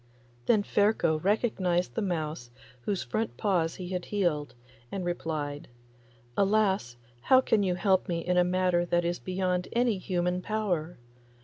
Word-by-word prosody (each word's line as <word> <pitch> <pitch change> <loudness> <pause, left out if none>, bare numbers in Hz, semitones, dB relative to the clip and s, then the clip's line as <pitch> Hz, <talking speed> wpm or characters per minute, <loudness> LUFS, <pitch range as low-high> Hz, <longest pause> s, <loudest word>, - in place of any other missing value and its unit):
Then 215 -3 +4
Ferko 200 -7 +2
recognised 190 -4 +1
the 225 - -1
mouse 155 - -3 0.4
whose 200 -3 -1
front 115 +1 -3
paws 175 -5 +1
he 180 -1 -7
had 180 -1 -3
healed, 155 -10 -1 0.4
and 190 -2 -3
replied, 155 -4 -3 0.7
'Alas 195 - +2
I 120 - -30 0.2
how 260 - +7
can 225 -4 +2
you 185 -2 +1
help 190 +1 +2
me 170 -1 -2
in 180 - +1
a 180 - +5
matter 180 -1 +2
that 175 0 +1
is 175 +1 -1
beyond 180 -1 -1
any 235 -4 +2
human 180 -1 -1
power! 180 -6 -2
180 Hz, 150 wpm, -29 LUFS, 165-200 Hz, 0.7 s, how